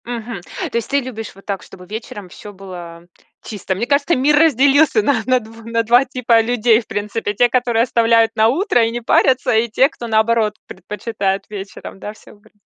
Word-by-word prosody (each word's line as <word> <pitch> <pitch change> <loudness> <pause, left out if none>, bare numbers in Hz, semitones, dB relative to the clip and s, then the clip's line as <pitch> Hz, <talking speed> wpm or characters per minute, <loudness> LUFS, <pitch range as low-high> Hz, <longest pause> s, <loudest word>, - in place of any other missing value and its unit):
Мгм. 235 -4 -6 0.3
То - - -8
есть 230 - -4
ты 280 - +2
любишь 230 -6 -7
вот 195 - -18
так, 200 -2 -4
чтобы 180 - -14
вечером 205 -1 -8
всё 205 +3 -11
было 175 -3 -10 0.4
чисто? 195 -3 -4
Мне 215 +6 -2
кажется, 285 +5 +1
мир 285 +3 +3
разделился 290 - +4
на 275 -6 +1
на 255 +1 +3
дв 225 0 -14
на 230 0 0
2 240 +4 +4
типа 245 -3 +2
людей, 230 0 +2
в 220 - -20
принципе. 210 +1 -3
Те, 240 +4 +3
которые 240 -2 +1
оставляют 230 -2 +2
на 220 0 +4
утро 270 - +2
и 225 - -2
не 240 +1 -4
парятся, 255 +1 +2
и 225 +2 +2
те, 260 +5 +3
кто, 240 -6 -9
наоборот, 220 -1 +1
предпочитает 195 0 -4
вечером, 195 -1 -9
да, 210 - -7
всё 215 - -18
убрать. 205 - -24
230 Hz, 200 wpm, -18 LUFS, 210-245 Hz, 0.4 s, разделился